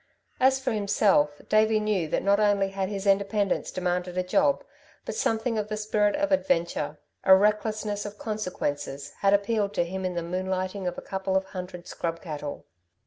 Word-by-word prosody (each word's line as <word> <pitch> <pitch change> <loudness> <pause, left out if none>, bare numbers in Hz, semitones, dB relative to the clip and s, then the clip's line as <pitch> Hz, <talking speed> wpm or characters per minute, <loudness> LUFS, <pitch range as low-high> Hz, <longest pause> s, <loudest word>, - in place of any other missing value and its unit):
As 265 +1 +4
for 265 -1 -1
himself, 200 -8 +2
Davey 215 0 +4
knew 210 -6 0
that - - -1
not 200 +1 +3
only 205 -2 +3
had 195 -1 -2
his 200 -1 -4
independence 200 0 +1
demanded 180 0 -2
a 185 - +2
job, 280 +10 +2 0.4
but - - -4
something 225 - 0
of 210 - -2
the 215 0 -3
spirit 210 -1 +1
of 295 0 0
adventure, 170 - 0 0.3
a 190 - +8
recklessness 210 +1 +1
of 205 0 -7
consequences, 145 -11 -3
had 200 0 +5
appealed 205 0 0
to 175 - +2
him 190 +2 -5
in 180 -1 -2
the 170 - -2
moonlighting 185 +2 -2
of 180 - -3
a - - -6
couple 190 0 -1
of 190 - 0
hundred 180 -2 -7
scrub 165 -1 -4
cattle. 150 -4 -6
195 Hz, 180 wpm, -27 LUFS, 180-215 Hz, 0.4 s, a